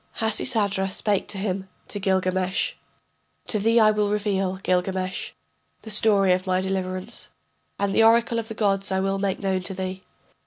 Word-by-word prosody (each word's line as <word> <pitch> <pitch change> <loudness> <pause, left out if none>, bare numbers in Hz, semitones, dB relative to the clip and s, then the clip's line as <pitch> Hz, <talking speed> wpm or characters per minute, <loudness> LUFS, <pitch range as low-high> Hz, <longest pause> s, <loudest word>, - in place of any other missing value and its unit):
] - - -29
Hasisadra 210 -3 +1
spake 200 +1 -1
to 200 - -5
him, 190 -1 -3 0.2
to 205 - -4
Gilgamesh: 185 -1 0 0.7
To 215 - +1
thee 225 +3 +3
I 215 -1 +6
will 210 -1 0
reveal, 200 -3 0
Gilgamesh, 185 0 -1 0.5
the 220 - -8
story 205 -3 +5
of 185 +1 -2
my 185 0 +2
deliverance, 190 +2 -4 0.5
And 200 -1 -1
the - - +4
oracle 230 +1 +4
of 225 - -5
the 220 - -7
gods 195 -3 0
I 190 - +1
will 195 0 0
make 195 -1 -1
known 190 -2 -1
to 190 +1 -3
thee. 185 0 -4
195 Hz, 170 wpm, -24 LUFS, 185-210 Hz, 0.7 s, I